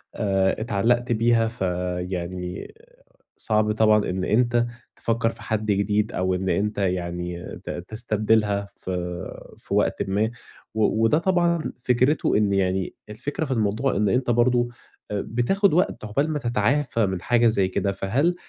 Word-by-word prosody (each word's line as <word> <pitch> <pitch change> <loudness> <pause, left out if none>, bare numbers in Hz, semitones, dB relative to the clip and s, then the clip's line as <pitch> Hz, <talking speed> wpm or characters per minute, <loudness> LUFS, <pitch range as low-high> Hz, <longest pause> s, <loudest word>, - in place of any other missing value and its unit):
آآ 95 -2 +1
اتعلقت 120 +3 +1
بيها، 115 0 +3
فيعني 90 - -4 0.6
صعب 105 -1 +1
طبعًا 105 -1 +3
إن 95 0 -2
أنت 120 +3 +2 0.3
تفكّر 115 0 0
في - - -10
حد 110 -1 -2
جديد، 105 +1 +1
أو 95 0 0
إن 95 +1 -2
أنت 105 +3 0
يعني 90 -2 -2 0.2
ت - - -8 0.2
تستبدلها 110 -2 +1
في 95 - -6 0.7
في - - -7
وقتٍ - - +1
ما، 105 +4 +1 0.4
و 110 +1 +1
وده 115 +7 +4
طبعًا 170 -1 +1
فكرته 125 +1 +2
إن 105 -2 +2
يعني 95 -1 0 0.2
الفكرة 140 +8 -4
في 135 - -6
الموضوع، 115 +2 0
إن 105 0 +2
أنت 125 +1 +1
برضه 120 +1 +3 0.4
بتاخد 120 - +1
وقتَ 180 - +1
عقبال 140 +9 0
ما 150 - -1
تتعافى 120 0 +1
من 95 -2 -3
حاجة 120 +1 +3
زي 100 -4 +2
كده. 100 +1 -1
فهل 130 - 0
110 Hz, 145 wpm, -24 LUFS, 95-120 Hz, 0.7 s, وده